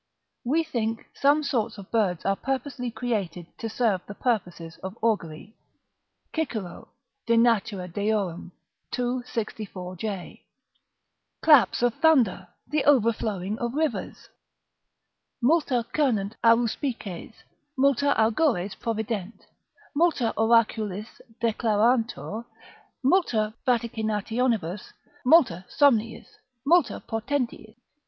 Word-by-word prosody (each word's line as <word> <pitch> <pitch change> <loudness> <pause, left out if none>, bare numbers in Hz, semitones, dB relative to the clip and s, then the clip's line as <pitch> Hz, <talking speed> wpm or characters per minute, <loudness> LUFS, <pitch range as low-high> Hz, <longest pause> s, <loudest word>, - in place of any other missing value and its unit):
["We 305 +7 +1
think 230 -7 -3
some 290 +2 +3
sorts 230 -6 -1
of 195 -2 -11
birds 200 -7 0
are 195 - +2
purposely 265 0 -3
created 215 -7 -3
to 225 - -3
serve 215 -5 +1
the 205 - -8
purposes 175 -9 -2
of 190 +3 -7
augury." 205 -3 -1 0.8
Cicero, 225 - -4 0.4
De 230 0 +4
Natura 210 -5 +2
Deor., 200 -2 -2 0.5
ii. 250 0 -1
64.] 205 -6 -5 1.5
claps 295 -6 +5
of 245 -1 +3
thunder, 240 - +3 0.2
the 300 0 0
overflowing 220 -6 +2
of 240 +2 -3
rivers 310 0 -2 1.1
"Multa 260 -3 +2
cernunt 225 -9 +1
Aruspices, 230 - 0 0.4
multa 280 +1 +3
Augures 220 - +2
provident, 220 -2 -4 0.5
multa 290 -8 +2
oraculis 220 -2 +1 0.2
declarantur, 230 0 +1 0.6
multa 245 - +2
vaticinationibus, 220 -4 -1 0.3
multa 250 - +4
somniis, 230 -6 +2 0.4
multa 345 +4 +3
portentis." 230 -1 -3
230 Hz, 90 wpm, -26 LUFS, 205-255 Hz, 1.5 s, claps